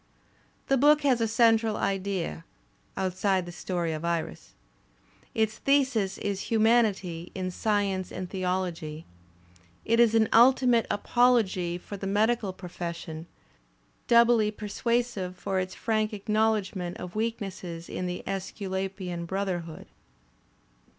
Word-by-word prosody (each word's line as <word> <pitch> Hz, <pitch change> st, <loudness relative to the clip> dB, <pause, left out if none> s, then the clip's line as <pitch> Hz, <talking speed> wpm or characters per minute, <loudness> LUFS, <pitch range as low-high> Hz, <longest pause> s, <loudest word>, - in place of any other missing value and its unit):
The 270 Hz, -, +2 dB
book 295 Hz, +3 st, +5 dB
has 255 Hz, -5 st, +3 dB
a 225 Hz, -, +2 dB
central 225 Hz, -1 st, +3 dB
idea 195 Hz, -4 st, -2 dB, 0.5 s
(outside 190 Hz, 0 st, 0 dB
the 175 Hz, -, -7 dB
story 175 Hz, -2 st, -2 dB
of 155 Hz, +1 st, -5 dB
Iris); 170 Hz, -1 st, -3 dB, 0.8 s
its 220 Hz, -1 st, 0 dB
thesis 260 Hz, -9 st, +2 dB
is 200 Hz, -1 st, -3 dB
humanity 215 Hz, -7 st, +2 dB
in 185 Hz, -1 st, -3 dB
science 200 Hz, -2 st, -1 dB
and 185 Hz, -, -5 dB
theology. 180 Hz, -4 st, -3 dB, 0.8 s
It 230 Hz, +1 st, +2 dB
is 230 Hz, -2 st, +5 dB
an 220 Hz, -1 st, +4 dB
ultimate 245 Hz, -1 st, +5 dB
apology 205 Hz, -7 st, +2 dB
for 200 Hz, +3 st, -8 dB
the 195 Hz, -, -5 dB
medical 215 Hz, +1 st, +1 dB
profession, 170 Hz, -3 st, -7 dB, 0.8 s
doubly 235 Hz, -2 st, +5 dB
persuasive 215 Hz, -2 st, -2 dB
for 190 Hz, -1 st, -1 dB
its 185 Hz, 0 st, -4 dB
frank 215 Hz, -1 st, 0 dB
acknowledgment 210 Hz, -4 st, 0 dB
of 180 Hz, +1 st, -8 dB
weaknesses 195 Hz, -6 st, -4 dB
in 180 Hz, -, -4 dB
the 180 Hz, 0 st, -4 dB
iSsculapian 190 Hz, -2 st, -4 dB
brotherhood. 180 Hz, -4 st, -3 dB
195 Hz, 115 wpm, -27 LUFS, 180-225 Hz, 0.8 s, book